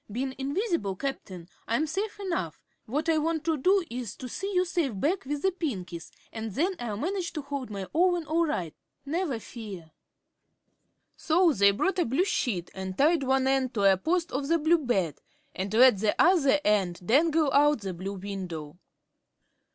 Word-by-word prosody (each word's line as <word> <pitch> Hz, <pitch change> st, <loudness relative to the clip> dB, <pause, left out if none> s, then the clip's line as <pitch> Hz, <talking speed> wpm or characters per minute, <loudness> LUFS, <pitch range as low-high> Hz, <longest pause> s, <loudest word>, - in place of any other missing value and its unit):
"Bein' 260 Hz, +4 st, -2 dB
invis'ble, 285 Hz, -, -1 dB
Cap'n, 185 Hz, -10 st, -5 dB, 0.2 s
I'm 235 Hz, +7 st, +1 dB
safe 400 Hz, +7 st, -3 dB
enough. 335 Hz, -, -3 dB, 0.3 s
What 290 Hz, +8 st, -2 dB
I 320 Hz, -1 st, +3 dB
want 320 Hz, 0 st, -1 dB
to 325 Hz, 0 st, +1 dB
do 370 Hz, +7 st, +3 dB
is 235 Hz, -3 st, -5 dB
to 255 Hz, -, -8 dB
see 390 Hz, -, -4 dB
you 365 Hz, -1 st, +2 dB
safe 325 Hz, -, -1 dB
back 340 Hz, -, 0 dB
with 290 Hz, +1 st, -3 dB
the 385 Hz, -, +3 dB
Pinkies, 190 Hz, -, -5 dB, 0.2 s
an' 225 Hz, 0 st, -4 dB
then 330 Hz, -, 0 dB
I'll 220 Hz, -4 st, -4 dB
manage 355 Hz, -, -2 dB
to 305 Hz, -3 st, -4 dB
hold 280 Hz, -3 st, -5 dB
my 200 Hz, -2 st, -5 dB
own 350 Hz, 0 st, +2 dB
all 330 Hz, +2 st, +1 dB
right, 175 Hz, -, -3 dB, 0.3 s
never 310 Hz, -3 st, -1 dB
fear." 205 Hz, -8 st, -9 dB, 1.2 s
So 330 Hz, 0 st, +3 dB
they 200 Hz, -4 st, +5 dB
brought 365 Hz, -, 0 dB
a -, -, +2 dB
blue 270 Hz, +11 st, +1 dB
sheet 205 Hz, -, -1 dB
and 190 Hz, -1 st, -6 dB
tied 310 Hz, +2 st, +4 dB
one 265 Hz, 0 st, +1 dB
end 265 Hz, -2 st, +1 dB
to 205 Hz, -, 0 dB
a 195 Hz, -1 st, +6 dB
post 335 Hz, -, -1 dB
of 275 Hz, +1 st, -2 dB
the 335 Hz, +2 st, +3 dB
blue 330 Hz, +2 st, +3 dB
bed 195 Hz, -, -1 dB, 0.3 s
and 190 Hz, +1 st, -4 dB
let 235 Hz, -2 st, +6 dB
the 210 Hz, 0 st, 0 dB
other 310 Hz, -6 st, +5 dB
end 190 Hz, -4 st, +1 dB
dangle 305 Hz, -, +3 dB
out 295 Hz, -3 st, +4 dB
the 190 Hz, -2 st, -4 dB
blue 190 Hz, +3 st, -5 dB
window. 180 Hz, -5 st, -6 dB
270 Hz, 180 wpm, -28 LUFS, 200-330 Hz, 1.2 s, a